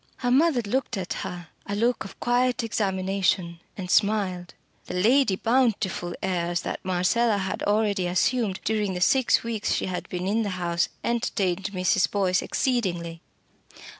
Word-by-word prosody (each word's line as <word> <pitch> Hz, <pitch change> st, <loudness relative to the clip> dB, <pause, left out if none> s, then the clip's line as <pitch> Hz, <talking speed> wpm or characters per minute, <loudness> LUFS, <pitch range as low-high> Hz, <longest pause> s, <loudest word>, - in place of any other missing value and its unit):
Her 245 Hz, -1 st, -1 dB
mother 275 Hz, -2 st, +3 dB
looked 235 Hz, +1 st, -1 dB
at 185 Hz, -2 st, -3 dB
her 175 Hz, -2 st, -6 dB, 0.2 s
a 205 Hz, -, -2 dB
look 235 Hz, +3 st, +1 dB
of 195 Hz, -, -11 dB
quiet 245 Hz, 0 st, +1 dB
examination 190 Hz, -4 st, 0 dB, 0.2 s
and 180 Hz, -2 st, -4 dB
smiled. 195 Hz, -4 st, +1 dB, 0.3 s
The -, -, -5 dB
Lady 225 Hz, +3 st, +3 dB
Bountiful 220 Hz, -7 st, 0 dB
airs 175 Hz, -2 st, -1 dB
that -, -, -5 dB
Marcella 190 Hz, +5 st, +2 dB
had 190 Hz, -1 st, -3 dB
already 205 Hz, -3 st, +1 dB
assumed 195 Hz, +2 st, 0 dB
during 210 Hz, -4 st, 0 dB
the -, -, -2 dB
six 260 Hz, +6 st, +3 dB
weeks 230 Hz, -2 st, -1 dB
she -, -, -1 dB
had 185 Hz, -1 st, -4 dB
been 180 Hz, 0 st, -3 dB
in 210 Hz, +4 st, +1 dB
the 210 Hz, -, -1 dB
house 170 Hz, -1 st, 0 dB
entertained 195 Hz, -6 st, -1 dB
Mrs. 190 Hz, -1 st, +1 dB
Boyce 185 Hz, -3 st, +1 dB
exceedingly. 175 Hz, -10 st, -1 dB
195 Hz, 150 wpm, -25 LUFS, 180-230 Hz, 0.3 s, mother